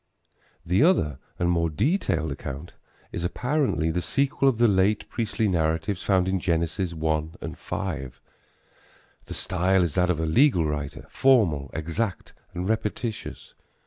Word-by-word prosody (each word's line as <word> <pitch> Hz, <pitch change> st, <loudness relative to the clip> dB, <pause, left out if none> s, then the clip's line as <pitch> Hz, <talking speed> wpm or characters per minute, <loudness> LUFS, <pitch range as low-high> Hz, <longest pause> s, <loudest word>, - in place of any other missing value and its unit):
The 90 Hz, +6 st, +2 dB
other 80 Hz, -, +3 dB, 0.2 s
and 85 Hz, -, 0 dB
more 85 Hz, -1 st, +2 dB
detailed 85 Hz, -, 0 dB
account 70 Hz, +4 st, -6 dB, 0.4 s
is 85 Hz, -, -4 dB
apparently 125 Hz, -, 0 dB
the 90 Hz, +2 st, -1 dB
sequel 140 Hz, +5 st, +2 dB
of 125 Hz, -, -1 dB
the 120 Hz, +1 st, +5 dB
late 100 Hz, +1 st, +2 dB
priestly 110 Hz, -1 st, -1 dB
narratives 85 Hz, +2 st, 0 dB
found 95 Hz, -3 st, +2 dB
in 95 Hz, 0 st, +1 dB
Genesis 85 Hz, +1 st, -1 dB
1 80 Hz, 0 st, -1 dB
and -, -, -6 dB
5. 70 Hz, -9 st, -5 dB, 1.1 s
The -, -, -7 dB
style 95 Hz, 0 st, +1 dB
is 85 Hz, -4 st, -1 dB
that 90 Hz, +1 st, +2 dB
of 85 Hz, -3 st, +1 dB
a 80 Hz, -, 0 dB
legal 90 Hz, -, +4 dB
writer 75 Hz, -1 st, -4 dB
formal, 95 Hz, -, +3 dB
exact 85 Hz, +6 st, -3 dB, 0.2 s
and 90 Hz, +1 st, -2 dB
repetitious. 110 Hz, +1 st, -3 dB
90 Hz, 145 wpm, -25 LUFS, 80-110 Hz, 1.1 s, the